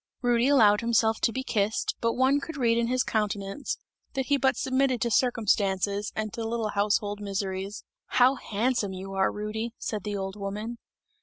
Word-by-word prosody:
Rudy 240 0 +3
allowed 220 -7 +5
himself 225 -1 +2
to - - +3
be 260 +3 -3
kissed, 215 -3 0
but 230 0 +1
one 265 +3 +3
could 310 +2 -7
read 235 -3 +3
in 235 0 +1
his 255 +1 +1
countenance, 210 +3 -2 0.4
that 265 -1 0
he 285 0 +2
but 265 0 +2
submitted 260 -1 +1
to 235 - 0
circumstances 205 -4 +1
and 215 -1 -3
to 230 - -4
little 225 -1 -1
household 205 0 0
miseries. 195 0 -3 0.2
"How 250 +1 +4
handsome 225 -4 -1
you 190 +1 -7
are, 190 0 +2
Rudy!" 220 +2 -4
said 210 -3 -4
the 205 -1 -3
old 195 0 -4
woman. 210 +4 -5
220 Hz, 175 wpm, -27 LUFS, 205-245 Hz, 0.4 s, allowed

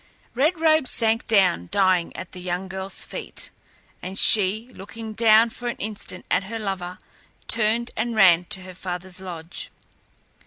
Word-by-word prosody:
Red 310 +7 +2
Robe 315 -4 +4
sank 225 -1 +1
down 185 - +3
dying 185 -3 +2
at 185 - -8
the 180 - -10
young 180 +1 -3
girl's 190 0 -1
feet, - - -5 0.5
and 190 +1 -6
she, 215 +3 +4
looking 220 +3 -8
down 225 +1 +5
for 245 +2 -6
an 240 - -2
instant 205 -3 -6
at 195 - +2
her 225 +3 -5
lover, 190 -4 -4 0.5
turned 230 +2 +1
and 230 +1 -2
ran 180 -4 +6
to 190 +1 -2
her 185 0 -9
father's 180 0 -6
lodge. 175 -3 -8
195 Hz, 155 wpm, -24 LUFS, 185-225 Hz, 0.5 s, ran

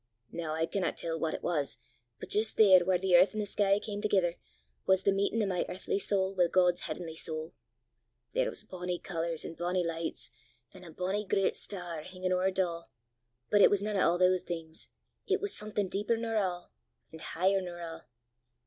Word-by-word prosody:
Noo 165 -2 -4
I 160 +1 0
canna 190 +2 -1
tell 165 -1 -4
what 160 -1 -1
it - - -8
was, 145 -9 -1 0.4
but - - -8
jist 215 +1 +4
there 195 -4 +8
whaur 185 0 +2
the 185 0 +2
earth 185 +4 +6
an' - - -2
the 210 - 0
sky 200 0 +2
cam 205 0 -5
thegither, 190 -5 +2 0.5
was 190 0 +4
the 200 - +4
meetin' 200 +3 +1
o' - - +1
my 185 -3 0
earthly 190 +2 -2
sowl 195 -1 0
wi' 180 -2 +3
God's 180 0 +3
h'avenly 165 -3 -5
sowl! 160 0 -5 0.8
There - - +1
was - - -6
bonnie 180 -3 -4
colours, 165 -2 -2
an' - - -6
bonnie 175 +1 -1
lichts, 165 0 -4 0.4
an' 185 - -13
a 175 - -10
bonnie 185 +5 -2
grit 195 +1 +1
star 175 -5 -6
hingin' 185 +2 -4
ower 185 +1 +2
't 185 - -11
a', 170 -1 -5 0.7
but 205 - +5
it - - +8
was 200 -1 +1
nane 210 0 -2
o' 175 -2 +3
a' - - -1
thae 185 0 +4
things; 165 -2 -6 0.4
it 395 0 +2
was 410 0 -2
something 210 -1 -1
deeper 210 +5 0
nor 225 0 -3
a', 185 -5 0 0.5
an' 160 - -9
heicher 190 +4 +1
nor 175 -1 -6
a'! 165 -3 -8
185 Hz, 205 wpm, -31 LUFS, 170-200 Hz, 0.8 s, there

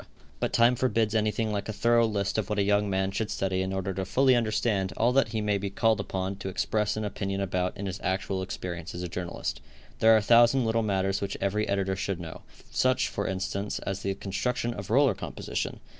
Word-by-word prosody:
But - - -1
time 120 +1 +4
forbids 115 -3 +1
anything 110 0 +1
like 100 +1 -3
a - - 0
thorough 115 +2 +3
list 100 0 -1
of 105 - -3
what 105 - -1
a 100 - +3
young 100 0 +2
man 95 0 0
should 105 +2 -2
study 95 -1 -1
in 95 0 -2
order 95 0 -2
to 95 +1 -2
fully 130 +7 +3
understand 110 -4 0
all 120 +2 +3
that 135 -2 +4
he 110 0 -2
may 105 -1 +1
be 100 0 -3
called 110 +2 +2
upon 95 -1 -3
to 95 - -5
express 105 +2 0
an 110 - -2
opinion 100 -1 -3
about 90 -1 -1
in 100 - -4
his 95 -1 -4
actual 95 0 -1
experience 90 -2 -5
as 90 - -5
a - - -2
journalist. 85 -4 -4 0.4
There 110 - +6
are 110 - +8
a - - +2
thousand 120 +3 +5
little 115 0 +1
matters 95 -2 0
which 100 -1 -3
every 105 +2 0
editor 95 -1 0
should 95 -1 -3
know; 80 -2 -8 0.3
such, 130 0 +2
for 100 - -3
instance, 95 +2 -2
as 95 -1 -4
the 95 0 -2
construction 120 +5 -2
of - - -7
roller 135 +1 +4
composition. - - -4
100 Hz, 220 wpm, -28 LUFS, 95-110 Hz, 0.4 s, are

